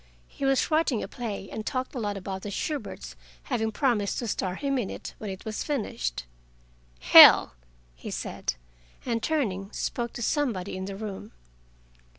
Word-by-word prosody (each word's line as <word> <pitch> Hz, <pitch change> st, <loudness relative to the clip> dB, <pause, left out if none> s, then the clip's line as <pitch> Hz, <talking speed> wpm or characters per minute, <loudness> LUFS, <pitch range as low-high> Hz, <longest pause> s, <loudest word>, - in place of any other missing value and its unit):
He 275 Hz, -, -5 dB
was 270 Hz, +3 st, +2 dB
writing 310 Hz, -7 st, +2 dB
a -, -, -5 dB
play, 215 Hz, -6 st, -5 dB
and 215 Hz, -, -5 dB
talked 255 Hz, +1 st, -3 dB
a 255 Hz, -, -4 dB
lot 205 Hz, -3 st, -2 dB
about 190 Hz, 0 st, -5 dB
the 205 Hz, -, -6 dB
Shuberts 290 Hz, +8 st, -4 dB, 0.3 s
having 225 Hz, -4 st, -1 dB
promised 215 Hz, -5 st, 0 dB
to 240 Hz, -, -3 dB
star 185 Hz, -3 st, -2 dB
him 275 Hz, +2 st, -1 dB
in 210 Hz, -, -2 dB
it -, -, -7 dB
when 215 Hz, -, -5 dB
it 190 Hz, -1 st, -8 dB
was 220 Hz, 0 st, -3 dB
finished. 65 Hz, -, -3 dB, 0.8 s
"Hell!" -, -, +9 dB, 0.4 s
he -, -, -9 dB
said, -, -, -3 dB, 0.5 s
and 230 Hz, -2 st, -1 dB
turning, 205 Hz, -11 st, -1 dB
spoke 235 Hz, -1 st, -3 dB
to 240 Hz, -, -5 dB
somebody 220 Hz, -, -1 dB
in 190 Hz, 0 st, -4 dB
the 195 Hz, 0 st, -6 dB
room. 200 Hz, -, -7 dB
220 Hz, 165 wpm, -27 LUFS, 195-260 Hz, 0.8 s, Hell